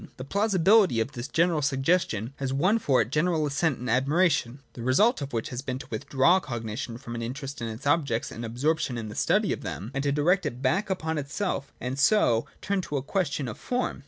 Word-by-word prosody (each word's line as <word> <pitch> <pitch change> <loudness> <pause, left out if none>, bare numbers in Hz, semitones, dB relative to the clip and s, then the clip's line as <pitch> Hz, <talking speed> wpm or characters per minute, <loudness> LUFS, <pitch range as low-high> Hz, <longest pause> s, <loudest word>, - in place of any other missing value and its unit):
The 130 - -6
plausibility 195 - +3
of 115 +5 -1
this 125 0 -6 0.3
suggestion 135 - 0
has 135 -1 -2
won 185 +12 +2
for 135 - +3
it 115 - -12
general 155 +1 +1
assent 145 0 0
and 125 - -6
admiration; 135 +1 +2 0.2
the 120 - -8
result 170 - +3
of 140 0 -5
which 115 -2 -2
has 125 0 -4
been 130 -2 -4
to - - -9
withdraw 135 - +3
cognition 115 -4 -5
from 120 -2 -8
an 115 - -4
interest 135 +3 -5
in 115 - -2
its 110 +4 -7
objects 140 -6 +1
and 115 - -7
absorption 125 +3 -1
in 110 -2 -5
the 105 - -8
study - - +2
of - - -6
them, 105 +6 -6
and 135 - -1
to 140 - +1
direct 165 +7 +2
it 120 - -5
back 145 +11 0
upon 160 -4 -1
itself; 140 0 -3
and 130 +2 -4
so 130 - +3 0.2
turn 200 -1 0
it 185 - -4
to 145 - -3
a 130 - -3
ques 185 +4 0
tion 140 -2 -3
of 110 - -7
form. 250 0 -2
140 Hz, 220 wpm, -27 LUFS, 120-165 Hz, 0.3 s, plausibility